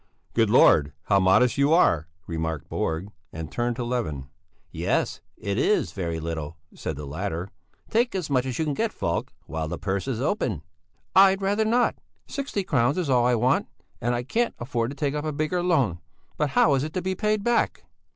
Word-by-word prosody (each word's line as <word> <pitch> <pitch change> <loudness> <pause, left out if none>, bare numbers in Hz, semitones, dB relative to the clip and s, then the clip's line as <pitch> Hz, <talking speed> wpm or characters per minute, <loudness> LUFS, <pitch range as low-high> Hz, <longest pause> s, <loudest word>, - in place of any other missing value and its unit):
"Good 115 -2 +3
Lord, 75 - +5
how 100 -1 +3
modest 105 +8 +4
you 140 +3 +4
are," 80 - +4 0.2
remarked 80 -2 -3
Borg, 80 +6 -2 0.2
and 80 -1 -7
turned 120 0 -1
to 125 - -3
Levin. 80 - -3 0.4
"Yes, - - -1 0.2
it 100 +2 -2
is 210 - +2
very 85 -4 -3
little," 80 -1 -5 0.2
said 80 - -4
the 75 +1 -7
latter. 85 +4 -4 0.4
"Take 235 +1 +1
as 185 -4 -2
much 130 -2 +1
as 125 - -3
you 160 - 0
can 150 - -1
get 225 +9 0
Falk 85 - -2
while 80 0 -3
the - - -4
purse 100 +3 -2
is 125 -4 -2
open." 125 - -1 0.5
"I'd 195 0 +6
rather 205 +3 +2
not! 240 +2 +2 0.3
Sixty 275 -8 -3
crowns 140 -3 +1
is 170 -7 0
all 120 -1 +4
I 125 - +3
want, 125 +4 +2 0.3
and 120 +1 +1
I 120 - -2
can't 235 - 0
afford 120 -2 -2
to 140 - -7
take 140 0 0
up 150 0 -2
a 155 - -1
bigger 155 +4 -1
loan. 135 - +1 0.4
But 150 -1 0
how 145 - +6
is 135 0 +1
it 155 +1 -5
to 185 - -1
be 190 0 0
paid 210 +2 0
back?" 240 +1 +1
125 Hz, 200 wpm, -25 LUFS, -, 0.5 s, I'd